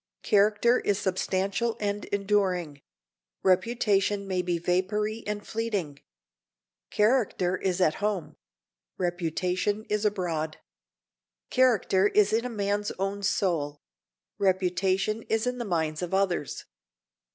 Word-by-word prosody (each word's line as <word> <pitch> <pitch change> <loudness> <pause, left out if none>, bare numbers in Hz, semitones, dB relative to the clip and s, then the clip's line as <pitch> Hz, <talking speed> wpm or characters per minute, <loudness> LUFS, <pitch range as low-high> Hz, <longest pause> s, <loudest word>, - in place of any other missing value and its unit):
Character 210 +4 +4
is 205 - 0
substantial 195 +3 -1
and 205 0 -2
enduring; 190 -7 0 0.6
reputation 200 0 +2
may 185 -1 0
be 175 -1 -1
vapory 210 +6 -1
and 210 0 -3
fleeting. 200 -11 -3 0.9
Character 210 -5 +2
is 185 -1 -1
at 160 -4 +3
home; 205 -5 -2 0.6
reputation 180 +4 -1
is 210 0 +1
abroad. 170 -7 -1 0.9
Character 220 -6 +3
is 210 0 +3
in 230 +2 +1
a - - -2
man's 205 -2 -1
own 195 +1 -2
soul; 165 -7 0 0.6
reputation 190 +2 +1
is 220 +1 +1
in 250 0 -2
the 240 - -3
minds 160 -4 -1
of 180 +1 -2
others. 190 -6 -1
195 Hz, 110 wpm, -27 LUFS, 180-210 Hz, 0.9 s, Character